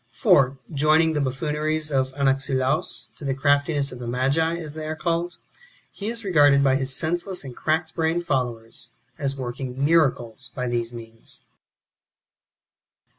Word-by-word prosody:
For, 135 0 +3 0.2
joining 155 +3 +3
the 150 - 0
buffooneries 150 +3 -1
of 130 -1 +1
Anaxilaus"^ 135 +2 0
to - - -10
the 135 -1 -1
craftiness 145 0 +2
of 125 - -9
the 120 - -6
ma(ji, 140 +7 +1
as 155 -3 -7
they 155 0 -6
are 155 - -3
called, 170 +2 -2 0.5
he 205 +2 -5
is 230 -2 -4
regarded 145 -6 +5
by 135 -1 +4
his 135 -1 -1
senseless 175 +3 -2
and 130 -3 -8
crack 160 +1 -1
brained 165 +1 0
followers 120 -6 -3 0.3
as 140 -1 -2
working 130 +1 -3
miracles 135 -6 +1
by 125 -1 -2
these 120 -1 -1
means. 115 -1 -10
140 Hz, 145 wpm, -24 LUFS, 130-160 Hz, 0.5 s, regarded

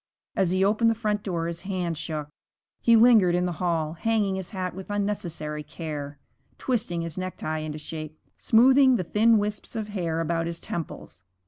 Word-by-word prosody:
As 190 -3 +2
he 185 +2 +2
opened 220 +3 +3
the 225 - +1
front 210 -2 -1
door 170 -5 -2
his 170 0 -4
hand 180 -4 -2
shook. 150 -1 -4 0.5
He 235 - +5
lingered 220 -6 +6
in 180 0 +1
the 180 - -1
hall, 165 -3 0
hanging 210 +2 0
his 190 -2 -4
hat 185 -3 -4
with 190 +2 -9
unnecessary 175 -7 -2
care, 150 -2 -6 0.4
twisting 205 -9 -1
his 165 +1 -5
necktie 170 -4 -3
into 155 -1 -5
shape, 155 0 -7 0.2
smoothing 260 +3 +5
the 185 - 0
thin 220 +6 +4
wisps 210 +2 -3
of 215 -2 -3
hair 170 -5 -2
about 165 0 -1
his 170 0 -4
temples. 95 - -7
180 Hz, 180 wpm, -26 LUFS, 165-210 Hz, 0.5 s, lingered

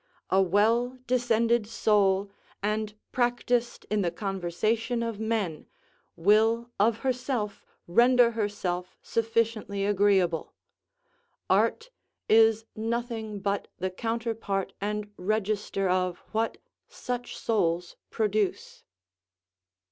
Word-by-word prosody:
A 190 - +5
well 225 +7 +2
descended 235 -2 +2
soul, 200 -3 +2 0.3
and 210 0 -1 0.2
practised 245 -1 0
in 210 -1 +2
the 175 - +1
conversation 215 +6 -1
of 230 -3 -4
men, 215 -8 -2 0.5
will 225 +6 +3
of 220 +2 +2
herself 250 -5 -2 0.2
render 240 +5 +5
herself 200 -5 -3
sufficiently 225 -3 0
agreeable; 195 -5 +2 1.0
art 480 +2 +2 0.4
is 225 0 +5
nothing 225 -2 -3
but 200 0 -1
the 185 +1 -2
counterpart 225 -2 -2
and 210 0 -3
register 205 0 -1
of 180 -1 +1
what 225 +1 -1 0.3
such 245 -1 -5
souls 175 -5 0
produce. 210 -3 -1
215 Hz, 95 wpm, -28 LUFS, 195-230 Hz, 1.0 s, A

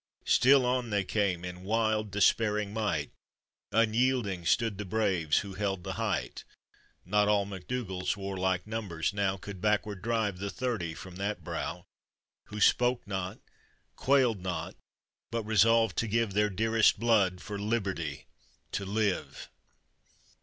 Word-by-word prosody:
Still 135 0 +5
on 125 -1 0
they 100 -2 +1
came, 95 -3 0
in 90 0 -7
wild 110 +1 0
despairing 105 +1 +2
might, 100 -9 -1 0.6
Unyielding 115 -5 +1
stood 115 -4 +1
the - - -2
braves 95 -6 +1
who 100 - -7
held 95 -2 -2
the - - -4
height; - - -2 0.6
Not 105 +3 +2
all 105 -1 +3
MacDougall's 95 -1 -3
warlike 95 -2 -1
numbers 105 -7 -3
now 100 -1 0
Could 95 -1 -9
backward 105 -1 0
drive 110 -4 -1
the 100 +1 -3
thirty 105 -9 -3
from 95 -1 -10
that 100 +2 -3
brow, - - -4 0.6
Who 105 - -7
spoke 120 +4 +3
not, 95 -2 -4 0.6
quailed 125 -7 +2
not, 90 -1 -4 0.5
but 115 -1 -2
resolved 110 +2 +4
to 115 - 0
give 115 -1 0
Their 105 +1 +2
dearest 110 +3 +3
blood 105 -6 +3
for 100 +2 -6
liberty 100 - -2 0.5
to 100 - -3
live. 105 -1 -2
105 Hz, 135 wpm, -30 LUFS, 95-115 Hz, 0.6 s, Still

